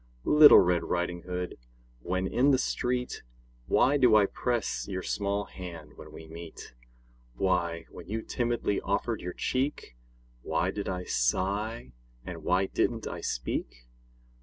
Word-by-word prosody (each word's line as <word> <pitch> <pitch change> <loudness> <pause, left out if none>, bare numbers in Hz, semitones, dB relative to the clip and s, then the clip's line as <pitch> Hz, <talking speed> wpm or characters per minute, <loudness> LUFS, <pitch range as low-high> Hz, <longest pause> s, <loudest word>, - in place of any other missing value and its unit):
Little 150 0 +9
Red 90 -1 +4
Riding 90 0 -2
Hood, 90 -4 -4 0.4
when 95 +8 -2
in 125 +8 +2
the 135 - +5
street, 125 -1 -2 0.5
Why 140 +3 +4
do 125 -5 +5
I 105 -2 +6
press 120 +2 -2
your 95 -2 -4
small 100 0 -1
hand 85 -6 -9
when - - -12
we 80 - -11
meet? 80 -3 -10 0.6
Why, 85 0 0
when - - -11
you 110 +2 -3
timidly 120 -4 -1
offered - - -1
your 90 0 -5
cheek, 130 - -2 0.5
Why - - 0
did 100 - -4
I 90 -1 -3
sigh, 95 - -1 0.3
and - - -7
why 90 +2 +2
didn't - - -1
I - - -5
speak? - - -4
95 Hz, 140 wpm, -29 LUFS, 85-115 Hz, 0.6 s, Little